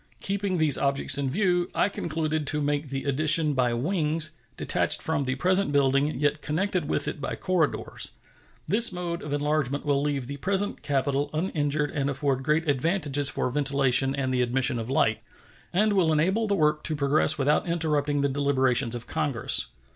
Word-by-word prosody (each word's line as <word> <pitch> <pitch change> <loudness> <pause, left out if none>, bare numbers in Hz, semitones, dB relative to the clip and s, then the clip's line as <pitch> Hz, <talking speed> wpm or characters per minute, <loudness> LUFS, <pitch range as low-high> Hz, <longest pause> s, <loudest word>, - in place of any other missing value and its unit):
Keeping 195 -1 -2
these 155 -4 +3
objects 140 0 +3
in 135 -1 -1
view, 180 +2 0
I - - +2
concluded 155 -5 -3
to 150 - +1
make 145 0 -2
the 135 0 -4
addition 150 +2 +3
by 125 -3 0
wings, 155 +2 -2 0.3
detached - - +2
from 160 -3 -2
the 130 0 -2
present 185 +4 0
building, 140 0 +1
yet 145 +1 0
connected 175 0 -2
with - - 0
it 145 - -5
by - - -4
corridors. 180 -5 -1 0.5
This 215 +7 +6
mode 175 -1 -4
of 150 - -7
enlargement 145 -1 -1
will 140 -1 +1
leave 140 -3 -2
the 140 +3 -7
present 195 +5 -2
Capitol 140 0 -1
uninjured 150 -3 -1
and 140 -2 -2
afford 140 -1 -1
great 155 +4 0
advantages 145 -1 +1
for - - -1
ventilation 135 -1 +1
and 130 -2 -2
the 125 - +1
admission 125 0 +1
of 115 +1 -6
light, 110 -4 +1 0.5
and 210 +4 +2
will 180 -5 +2
enable 190 +9 +1
the 200 - +1
work 150 -3 +1
to 155 - +1
progress 150 +2 +2
without 145 +5 +1
interrupting 150 -4 0
the 140 - +2
deliberations 135 -3 0
of 120 0 -7
Congress. 145 -7 0
145 Hz, 175 wpm, -26 LUFS, 140-160 Hz, 0.5 s, This